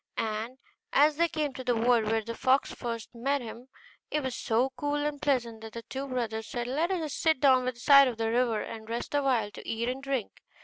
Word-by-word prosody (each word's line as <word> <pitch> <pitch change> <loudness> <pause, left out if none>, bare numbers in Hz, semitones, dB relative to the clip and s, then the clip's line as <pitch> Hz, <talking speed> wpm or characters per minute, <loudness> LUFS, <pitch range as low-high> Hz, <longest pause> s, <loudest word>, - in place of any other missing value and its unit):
And 225 +3 -3 0.4
as 295 +1 +5
they 340 +1 +3
came 305 -4 -2
to 260 - -7
the 245 -1 +1
wood 230 0 +3
where 220 +1 0
the 230 +2 -5
fox 260 +3 +2
first 230 -2 -5
met 275 +4 0
them, 240 +1 -9 0.4
it 300 -1 -1
was 260 -1 -2
so 240 +4 +1
cool 290 +3 -1
and 295 -1 -2
pleasant 235 -6 0
that 220 -1 -9
the 230 - -7
two 270 +3 -5
brothers 225 -4 -3
said, 240 -1 -3
'Let 295 +8 0
us 325 -6 -2
sit 320 -4 +2
down 260 -2 +5
by 255 - +1
the 240 - -18
side 275 +2 +7
of 240 -3 -3
the 225 0 0
river, 235 -3 +1
and 220 0 -8
rest 235 +4 -4
a 290 - +3
while, 240 -7 +1
to - - -11
eat 230 +1 -1
and 260 +2 -4
drink. 275 -6 -2
250 Hz, 235 wpm, -29 LUFS, 230-275 Hz, 0.4 s, side